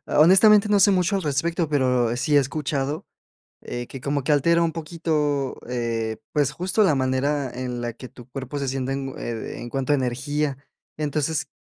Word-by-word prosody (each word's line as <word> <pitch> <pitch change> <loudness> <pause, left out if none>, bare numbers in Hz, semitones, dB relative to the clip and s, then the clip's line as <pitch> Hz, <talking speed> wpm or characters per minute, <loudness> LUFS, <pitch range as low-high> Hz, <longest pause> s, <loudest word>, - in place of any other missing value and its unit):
honestamente, 200 +6 +6
no 205 -1 +4
sé 200 - +6
mucho 185 +1 +2
al 190 - -2
respecto, 160 +3 0
pero 125 -4 +1
sí 145 +4 0
he - - +7
escuchado, 145 +3 -2 0.6
eh, 120 0 -5
que 135 - -8
como 140 0 -2
que 150 - +1
altera 170 +4 +3
un 165 - +1
poquito, 155 -4 -1
eh, 115 -2 -2
pues, 145 -2 +1
justo 185 +6 +1
la 155 -7 +3
manera 130 +1 0
en 125 -1 -4
la 120 0 -2
que 125 +2 -10
tu 120 - -14
cuerpo 135 +2 -6
se 140 -2 -2
siente 135 0 -2
en 135 0 -3
oh - - -10
ed 115 -1 -5
en 120 - -6
cuanto 135 +2 -1
a - - +5
energía. 135 +3 -1 0.4
Entonces, 150 +1 -1
140 Hz, 190 wpm, -24 LUFS, 130-160 Hz, 0.6 s, he